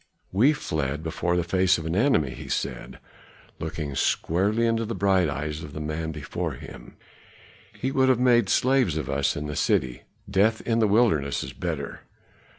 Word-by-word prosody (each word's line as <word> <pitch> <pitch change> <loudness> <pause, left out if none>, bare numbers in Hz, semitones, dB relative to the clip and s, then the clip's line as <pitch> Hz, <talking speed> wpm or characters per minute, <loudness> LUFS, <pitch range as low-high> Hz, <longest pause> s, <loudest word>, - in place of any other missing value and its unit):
"We 115 +10 +4
fled 75 - -3
before 85 +2 -1
the 90 - +1
face 95 +2 +2
of 80 - -6
an 80 +2 -2
enemy," 95 - +2
he - - -9
said, - - -3 0.6
looking 70 -2 -4
squarely 95 - +1
into 115 0 +1
the 115 0 -4
bright 95 -3 +2
eyes 75 +2 -4
of 75 -2 -9
the 75 - -5
man 80 +1 -3
before 75 -2 -4
him. - - -11 0.8
"He 130 - -1
would 130 -1 +3
have 130 - +4
made 120 -5 +4
slaves 125 - +2
of 75 - -3
us 70 0 +1
in 75 - -4
the 75 0 -4
city; 65 -3 0 0.3
death 105 +3 +2
in 115 -1 0
the 110 - +4
wilderness 100 - +2
is - - -7
better." - - -4
90 Hz, 175 wpm, -25 LUFS, 75-115 Hz, 0.8 s, We